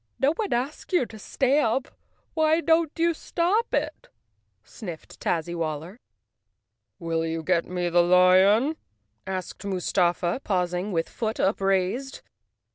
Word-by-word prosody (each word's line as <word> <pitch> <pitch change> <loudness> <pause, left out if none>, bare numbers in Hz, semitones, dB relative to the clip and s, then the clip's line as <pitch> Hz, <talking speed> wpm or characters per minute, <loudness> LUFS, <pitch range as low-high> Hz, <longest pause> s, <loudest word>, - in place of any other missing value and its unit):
"No 280 +3 +3
one 415 +3 -3
asked 265 +9 -3
you 350 -8 +3
to 220 -2 -12
stamp. 265 +2 +1 0.5
Why 315 0 +3
don't 330 -2 +2
you 335 +1 +2
stop 370 +8 0
it?" - - -2 0.6
sniffed 175 -9 -10
Tazzywaller. 165 +2 -3 1.0
"Will 165 -2 -2
you 165 0 -3
get 170 0 +1
me 180 -1 -2
the 175 0 +4
lion?" 185 - +5 0.5
asked 185 -1 -5
Mustafa, 180 +1 0
paus¬ 180 -3 0
ing 180 +4 -2
with 165 -2 0
foot 220 -1 -4
upraised. 195 +6 0
195 Hz, 120 wpm, -25 LUFS, 175-275 Hz, 1.0 s, lion